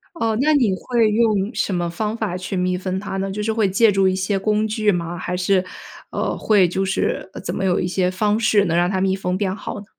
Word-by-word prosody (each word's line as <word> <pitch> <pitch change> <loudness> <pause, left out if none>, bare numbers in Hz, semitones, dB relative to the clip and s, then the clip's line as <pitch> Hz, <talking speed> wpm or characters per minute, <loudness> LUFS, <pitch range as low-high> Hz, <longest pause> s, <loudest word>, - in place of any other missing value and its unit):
哦， 225 -8 0
那 305 +2 +3
你 240 -9 +3
会 230 +1 +1
用 215 -1 +1
什 205 -2 -1
么 175 -1 -1
方 210 +6 -3
法 210 -6 -3
去 185 +1 -5
密封 185 +1 -1
它 195 -1 -5
呢？ 195 0 -2
就 210 +2 -4
是 220 - 0
会 220 -3 +1
借 210 +3 +4
助 195 -1 +3
一 185 - +1
些 195 +1 -1
工 210 +2 +1
具 215 0 0
吗？ 175 -2 -1
还 180 - -3
是， 185 +1 +2 0.5
呃， - - -2
会 205 -4 +3
就 190 +2 -1
是， 190 0 -1
呃， - - -8
怎 - - -4
么 - - -2
有 180 -2 +2
一 - - -1
些 180 0 0
方 210 +3 0
式 215 -2 +3
能 170 -3 0
让 175 +1 +2
它 190 -1 -1
密 190 0 +2
封 185 -1 -2
变 190 -2 -1
好 210 - -6
呢？ - - -13
195 Hz, 275 characters per minute, -21 LUFS, 185-215 Hz, 0.5 s, 借